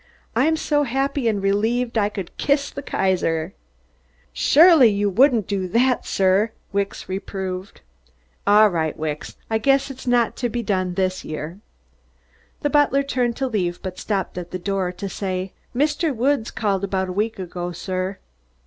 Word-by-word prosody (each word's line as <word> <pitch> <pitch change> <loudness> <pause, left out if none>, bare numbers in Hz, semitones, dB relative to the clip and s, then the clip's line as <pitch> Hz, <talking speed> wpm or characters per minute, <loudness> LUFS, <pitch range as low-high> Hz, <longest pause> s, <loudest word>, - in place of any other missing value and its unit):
"I'm 310 +7 +3
so 295 -2 +1
happy 270 -1 0
and 205 -3 0
relieved 230 +5 +1
I 205 -2 +2
could 195 -4 -7
kiss 280 0 +1
the 280 - -6
Kaiser." 185 - 0
"You - - -38
surely 275 - +6
wouldn't 230 +2 +4
do 195 -2 -2
that, 245 +6 +1
sir," 195 +3 +2 0.2
Wicks 200 0 -2
reproved. 190 0 -5 0.7
"All 210 +1 +7
right, 160 -4 -1
Wicks. 155 -1 -5
I 220 0 0
guess 275 +3 +2
it's 260 -1 -11
not 245 0 +1
being 235 0 -3
done 185 -3 0
this 185 -1 -1
year." 155 +4 -6 1.0
The 290 - 0
butler 290 -2 +3
turned 250 -4 0
to 265 +1 -1
leave 180 -7 -1
but 185 -1 -6
stopped 195 -3 -2
at 175 -1 -8
the 185 - -4
door 190 0 -1
to 195 +2 -6
say: 185 -1 -4 0.2
"Mr. 295 +2 +1
Woods 250 0 +1
called 200 -3 -1
about 190 -1 -1
a - - -3
week 215 +4 -1
ago, 175 -1 -5
sir." 185 +2 -3
200 Hz, 155 wpm, -22 LUFS, 185-250 Hz, 1.0 s, All